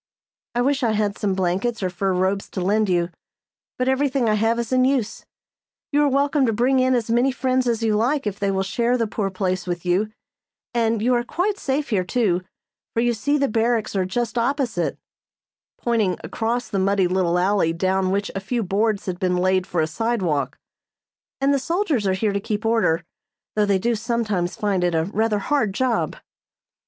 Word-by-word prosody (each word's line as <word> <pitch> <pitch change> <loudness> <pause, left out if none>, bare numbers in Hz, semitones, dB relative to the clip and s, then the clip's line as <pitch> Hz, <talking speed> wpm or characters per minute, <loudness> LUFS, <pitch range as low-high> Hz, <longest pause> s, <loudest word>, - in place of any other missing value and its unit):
"I 240 - +2
wish 280 +1 +1
I 230 -3 +2
had 205 -1 0
some 195 -2 0
blankets 190 +5 -1
or 185 - 0
fur 190 +1 -1
robes 190 +2 0
to - - -5
lend 205 +3 +2
you, 175 -1 +1 0.7
but 255 - 0
everything 265 -2 +1
I 215 - +3
have 225 +2 +2
is 235 +1 -2
in 255 0 +4
use. 255 -5 0 0.6
You 290 0 +3
are 290 - +4
welcome 280 0 +2
to - - +2
bring 255 +4 +2
in 255 0 +3
as 230 -2 -1
many 245 +3 +3
friends 255 -1 0
as 230 -1 0
you 220 -2 +2
like 255 +6 +1
if 205 -1 -3
they 200 - 0
will 190 0 0
share 235 +5 +1
the 230 - +1
poor 210 -2 -2
place 185 -1 -2
with 175 0 -3
you; 190 +5 +1 0.6
and 225 -2 +1
you 250 +2 +3
are 240 -1 +2
quite 390 +10 -1
safe 280 +1 -2
here, 195 -4 +2
too, 185 -3 +1 0.5
for 230 - +2
you 240 0 +2
see 285 +7 0
the 280 -1 +2
barracks 225 -1 0
are 190 - +2
just 235 +5 -2
opposite," 240 - -1 0.8
pointing 220 -7 0
across 235 +2 -2
the 200 - -2
muddy 195 0 +2
little 180 -1 +1
alley 185 -2 +2
down 185 +2 0
which 200 +2 -1
a 195 - -2
few 230 +4 -2
boards 205 +2 0
had 180 -2 -4
been 180 -1 +1
laid 185 0 +1
for 175 - 0
a - - +2
sidewalk; 185 -5 -1 0.8
"and 275 +1 +3
the 280 - +2
soldiers 320 - 0
are 190 - +2
here 205 +2 0
to 200 - 0
keep 210 +2 -3
order, 220 -8 +2 0.5
though 210 -1 +2
they 200 -1 +3
do 235 +5 0
sometimes 215 -5 -1
find 200 -4 0
it 175 -2 +1 0.2
rather 220 -1 +1
a - - -4
hard 220 -7 0
job." 255 -1 0
215 Hz, 200 wpm, -22 LUFS, 190-245 Hz, 0.8 s, in